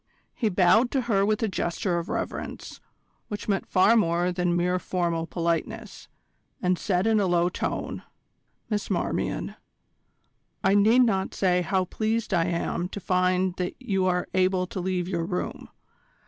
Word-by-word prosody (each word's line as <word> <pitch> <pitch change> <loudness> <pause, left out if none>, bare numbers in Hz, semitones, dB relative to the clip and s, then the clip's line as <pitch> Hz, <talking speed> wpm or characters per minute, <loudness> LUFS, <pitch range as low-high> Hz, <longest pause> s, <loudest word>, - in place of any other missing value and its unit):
He 225 - 0
bowed 205 +6 +4
to 270 - 0
her 215 -5 +1
with 215 +2 +1
a - - +2
gesture 175 -1 -1
of 170 - -7
reverence, - - -5 0.5
which 210 -1 -6
meant 200 -2 0
far 195 +5 +4
more 175 -4 +2
than 180 -1 0
mere 180 +1 +1
formal 170 -3 -1
politeness, 170 -2 -3 0.5
and 180 -1 +1
said 185 -2 0
in 220 -1 +3
a 200 - +2
low 175 0 +2
tone: - - -3 0.7
"Miss 210 -2 -2
Marmion, - - -2 1.1
I 195 - +4
need 220 +5 +5
not 195 -5 0
say 180 -2 +2
how 185 +2 0
pleased 220 +2 -2
I 170 -2 +3
am 175 0 -2
to 200 - -6
find 185 0 +1
that 180 -1 -3
you 195 -7 0
are 180 -1 0
able 185 0 +2
to 185 - -6
leave 180 -1 -1
your 170 -3 -1
room. 180 +2 -4
185 Hz, 160 wpm, -26 LUFS, 175-205 Hz, 1.1 s, need